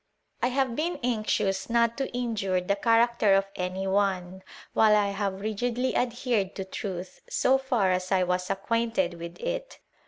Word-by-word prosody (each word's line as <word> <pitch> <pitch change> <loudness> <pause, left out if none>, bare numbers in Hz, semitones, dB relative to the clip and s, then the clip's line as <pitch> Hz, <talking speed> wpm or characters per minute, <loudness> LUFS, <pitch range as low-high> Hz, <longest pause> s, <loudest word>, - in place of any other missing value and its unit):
I - - +3
have 260 -1 0
been 335 +5 -1
anxious 215 -5 0
not 235 0 +3
to 270 - -1
injure 220 -7 -1
tl 200 +3 -2
character 230 -3 +4
of 195 0 +3
any 185 +1 -3
one, 190 -2 0 0.3
while 215 -1 +5
I 205 -1 +2
have 195 -1 -3
rigidly 240 +4 -1
adhered 240 -5 0 0.2
truth, 185 -2 -5
so 265 +1 +3
far 245 -8 +1
as 185 +1 -1
I 185 -1 +4
was 180 0 -1
acquainted 230 +5 0
with 170 0 -7
it. - - -4
210 Hz, 155 wpm, -27 LUFS, 190-240 Hz, 0.3 s, while